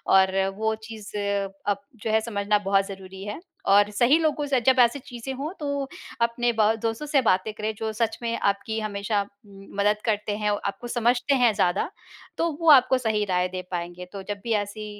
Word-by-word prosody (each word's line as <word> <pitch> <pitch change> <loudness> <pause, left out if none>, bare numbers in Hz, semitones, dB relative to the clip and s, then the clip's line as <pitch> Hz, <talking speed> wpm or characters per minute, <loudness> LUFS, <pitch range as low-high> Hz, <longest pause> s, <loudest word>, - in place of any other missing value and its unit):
और 190 0 +4
वो 220 +1 +1
चीज़ 215 -2 -9
अब 200 0 -2
जो 220 0 -4
है 220 - +4
समझना 210 -2 0
बहुत 195 0 +3
ज़रूरी 190 -1 -9
है 205 +6 -5 0.3
और 205 +1 +6
सही 245 +7 +4
लोगों 305 -2 0
से 270 -2 +2
जब 260 +2 +4
ऐसी 245 +3 +4
चीज़ें 245 +1 -7
हों 285 +5 -4
तो 285 -2 -2 0.3
अपने 235 +1 +2
ब 215 0 +5
दोस्तों 225 +5 -2
से 285 -2 +3
बातें 205 -2 +2
करें 215 +1 -3
जो 220 +1 -2
सच 225 0 -1
में 230 0 -1
आपकी 200 +2 -1
हमेशा 205 0 -1 0.3
मदद 200 +1 -1
करते 210 -2 0
हैं, 210 -1 0
आपको 205 +3 -3
समझते 245 +3 +2
हैं 245 -4 +4
ज़्यादा। 190 - +1 0.5
तो 335 0 +1
वो 330 - +4
आपको 260 -2 +6
सही 220 -4 0
राय 180 0 +2
दे 185 0 -4
पाएँगे। 175 0 -4
तो 195 -1 -6
जब 205 -1 -4
भी 235 - -3
ऐसी 215 +1 -8
215 Hz, 190 wpm, -25 LUFS, 200-240 Hz, 0.5 s, और